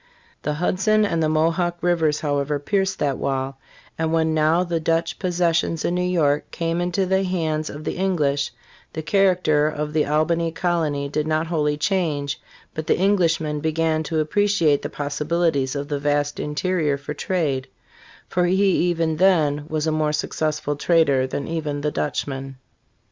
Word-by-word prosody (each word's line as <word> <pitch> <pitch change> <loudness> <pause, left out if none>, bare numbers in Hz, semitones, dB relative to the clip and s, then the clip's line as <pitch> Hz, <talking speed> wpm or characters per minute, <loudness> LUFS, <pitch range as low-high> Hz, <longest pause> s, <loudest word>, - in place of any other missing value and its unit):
The 150 0 -2
Hudson 210 +6 +2
and 165 -5 0
the 155 - +2
Mo 155 +1 +3
hawk 175 0 -1
rivers 165 -4 +1
however 145 -1 0
pierced 190 +5 0
that 140 -3 -1
wall; 135 0 -2 0.4
and 160 0 0
when 160 -1 +2
now 155 +3 +3
the 170 -2 -1
Dutch 165 +1 0
possessions 170 -3 0
in 175 - 0
New 180 - 0
York 160 -5 +1
came 165 0 -2
into 180 +2 0
the 190 +1 +2
hands 160 -5 -1
of 150 +2 -8
the - - -3
English, 150 -7 +1 0.4
the 160 - -4
character 180 -6 +3
of 150 0 -3
the 155 -1 +2
Al 150 +2 +2
bany 170 0 0
colony 160 -6 0
did 150 +2 -2
not 155 +1 +1
wholly 150 -3 0
change, 150 -5 -1 0.3
but 155 0 -5
the - - +3
Englishman 165 -6 +1
began 160 +1 0
to 160 -1 -1
appreci 205 +1 +1
ate 145 -1 +3
the - - -4
possibilities 150 -1 -1
of 140 0 -3
the 145 -1 -2
vast 145 0 0
interior 150 -1 0
for 145 +1 -6
trade; 150 -5 -1 0.6
for 180 0 +1
he 190 +2 +3 0.2
even 165 -2 0
then 155 -6 +3
was 155 -1 -2
a 160 - +1
more 155 -1 0
successful 150 -1 -1
trader 145 -4 +3
than 140 +1 -4
even 155 -3 -3
the 150 +1 -1
Dutchman. 135 -2 -3
155 Hz, 170 wpm, -22 LUFS, 150-175 Hz, 0.6 s, Mo